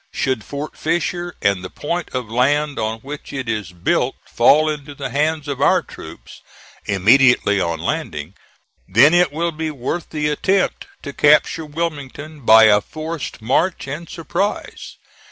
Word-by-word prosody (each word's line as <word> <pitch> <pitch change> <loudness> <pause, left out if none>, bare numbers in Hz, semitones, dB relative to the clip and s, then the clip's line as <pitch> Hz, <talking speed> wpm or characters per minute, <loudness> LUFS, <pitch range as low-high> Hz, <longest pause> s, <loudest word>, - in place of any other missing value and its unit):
Should 130 -5 -1
Fort 145 +2 -6
Fisher 175 +2 -2
and 100 -2 +1
the 90 - -6
point 170 - -4
of 125 -3 -3
land 140 +6 +1
on 110 0 -3
which 145 +3 -8
it 130 -3 -5
is 105 -5 -3
built 90 -1 0
fall 155 +2 +4
into 145 -2 -5
the 140 -1 -5
hands 150 +1 0
of 140 -2 -4
our - - +4
troops - - -12 0.5
immediately 105 0 +4
on 85 -2 -2
landing, 75 0 -4 0.5
then 125 - +5
it 175 -3 +4
will 170 +3 -1
be 160 0 -4
worth 150 +4 -4
the 150 -1 -2
attempt 190 +6 0 0.2
to 140 - -6
capture 150 +3 +3
Wilmington 150 -1 -5
by 110 0 +7
a 105 -1 +6
forced 155 -3 -6
march 165 +10 0
and 155 +4 -6
surprise. 195 +5 -4
145 Hz, 155 wpm, -19 LUFS, 115-155 Hz, 0.5 s, by